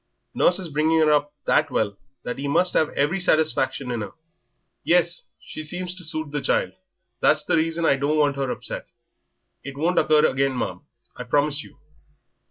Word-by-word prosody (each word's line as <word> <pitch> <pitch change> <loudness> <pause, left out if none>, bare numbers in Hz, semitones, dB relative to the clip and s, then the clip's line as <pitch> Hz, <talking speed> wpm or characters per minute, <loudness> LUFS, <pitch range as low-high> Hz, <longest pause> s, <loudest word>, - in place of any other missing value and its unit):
Nurse 175 - +4
is 185 -4 -5
bringing 155 +2 +1
her 155 -1 +4
up 145 0 +1
that 155 - +2
well 105 -6 -1 0.3
that 125 - -5
yer 140 0 -3
must 180 +5 +2
have 155 - +2
every 150 +7 +1
satisfaction 140 -7 +1
in 120 -2 -3
'er." 105 - -7 0.7
"Yes, 175 0 +1
she 155 - -8
seems 180 +3 -4
to 180 0 -10
suit 155 -2 -4
the 145 -1 -2
child; - - 0 0.5
that's 150 0 +3
the - - +2
reason 165 +1 0
I 140 - +3
don't 145 +3 0
want 145 -2 +2
her 135 -2 -2
upset." - - -5 0.8
"It 135 +1 -8
won't 170 +5 +2
occur 155 -1 +4
again, 135 0 0
ma'am, - - -3 0.3
I 125 - -6
promise 145 +3 0
you." - - -17
150 Hz, 180 wpm, -23 LUFS, 140-160 Hz, 0.8 s, Nurse